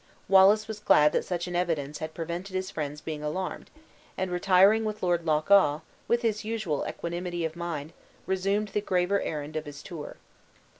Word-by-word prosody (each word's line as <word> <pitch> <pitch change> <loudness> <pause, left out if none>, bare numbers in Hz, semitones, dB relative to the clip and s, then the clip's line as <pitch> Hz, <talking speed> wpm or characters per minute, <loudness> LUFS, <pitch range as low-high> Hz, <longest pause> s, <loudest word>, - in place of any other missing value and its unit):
Wallace 195 +3 +6
was 220 -1 -6
glad 150 -7 +5
that - - +1
such 175 -1 -2
an 175 -1 -5
evidence 155 -5 -1
had 155 0 -6
prevented 175 +3 -5
his 185 +1 -2
friends 150 -1 -4
being 155 -2 -5
alarmed; 155 +5 -4 0.5
and 185 -1 -2
retiring 190 +4 +4
with 215 -1 -4
Lord 175 -2 +1
Loch 155 +3 +1
awe, 155 -7 +5 0.3
with 235 0 +1
his 215 -2 0
usual 215 -9 -2
equanimity 175 0 -4
of 160 0 -4
mind 165 -3 -5 0.3
resumed 195 +2 0
the 210 - -1
graver 185 0 +1
errand 150 0 -4
of 155 0 -3
his 145 0 -9
tour. 160 -4 -8
175 Hz, 180 wpm, -28 LUFS, 155-195 Hz, 0.5 s, Wallace